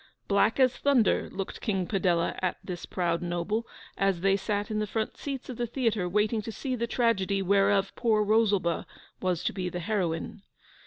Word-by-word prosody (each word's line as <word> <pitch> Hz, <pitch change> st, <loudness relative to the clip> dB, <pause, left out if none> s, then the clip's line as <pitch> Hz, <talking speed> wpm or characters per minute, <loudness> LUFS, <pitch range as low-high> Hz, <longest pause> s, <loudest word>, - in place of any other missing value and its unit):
Black 205 Hz, +4 st, +3 dB
as 255 Hz, -1 st, +4 dB
thunder 270 Hz, -6 st, +2 dB
looked 195 Hz, -1 st, -5 dB
King 195 Hz, -5 st, 0 dB
Padella 180 Hz, -4 st, +1 dB
at 185 Hz, -1 st, 0 dB
this 175 Hz, -2 st, -6 dB
proud 170 Hz, -2 st, -1 dB
noble, 175 Hz, +6 st, -2 dB, 0.3 s
as 195 Hz, -3 st, +1 dB
they 195 Hz, +1 st, +4 dB
sat 205 Hz, +1 st, -2 dB
in 215 Hz, -, 0 dB
the 210 Hz, -, -1 dB
front 220 Hz, +2 st, -2 dB
seats 275 Hz, -3 st, -5 dB
of 250 Hz, -, -6 dB
the 240 Hz, -1 st, -1 dB
theatre 225 Hz, -7 st, 0 dB
waiting 210 Hz, +3 st, +1 dB
to 225 Hz, -, -6 dB
see 255 Hz, +3 st, -3 dB
the 235 Hz, -1 st, -2 dB
tragedy 205 Hz, -5 st, +1 dB
whereof 195 Hz, 0 st, +3 dB
poor 220 Hz, -3 st, +2 dB
Rosalba 205 Hz, -5 st, +2 dB, 0.3 s
was 180 Hz, -2 st, 0 dB
to -, -, 0 dB
be 185 Hz, -2 st, -2 dB
the 175 Hz, -, -4 dB
heroine. 180 Hz, 0 st, -2 dB
200 Hz, 180 wpm, -28 LUFS, 185-225 Hz, 0.3 s, as